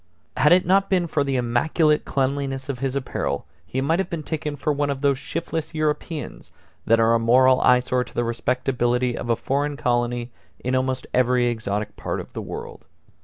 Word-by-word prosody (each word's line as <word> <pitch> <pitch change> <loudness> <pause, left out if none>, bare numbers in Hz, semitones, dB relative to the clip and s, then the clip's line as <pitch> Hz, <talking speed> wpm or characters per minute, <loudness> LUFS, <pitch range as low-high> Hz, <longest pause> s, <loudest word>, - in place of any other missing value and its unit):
Had 150 +4 +4
it 180 +1 +5
not 195 +2 +3
been 180 -3 +2
for 155 -3 0
the 135 -1 -1
immaculate 150 +6 +2
cleanliness 135 0 -1
of 130 -3 -3
his 135 0 -2
apparel 135 -2 -2 0.2
he 130 +7 -2
might 160 +6 +1
have 190 - -1
been 165 -3 -4
taken 150 -1 -3
for 150 +1 -1
one 145 0 0
of 135 -1 -3
those 140 -2 +2
shiftless 165 +1 -4
Europeans 155 +1 -3 0.4
that 115 +1 +5
are 115 0 +4
a 115 - +3
moral 130 +3 +5
eyesore 125 0 +3
to - - -15
the 120 - +1
respectability 125 +1 0
of 120 - -5
a 115 - +4
foreign 145 +4 -1
colony 120 -3 -1 0.3
in 125 - -2
almost 130 0 0
every 125 0 +3
exotic 105 -3 -2
part - - -3
of - - -9
the - - -4
world. - - -8
130 Hz, 190 wpm, -23 LUFS, 120-150 Hz, 0.4 s, it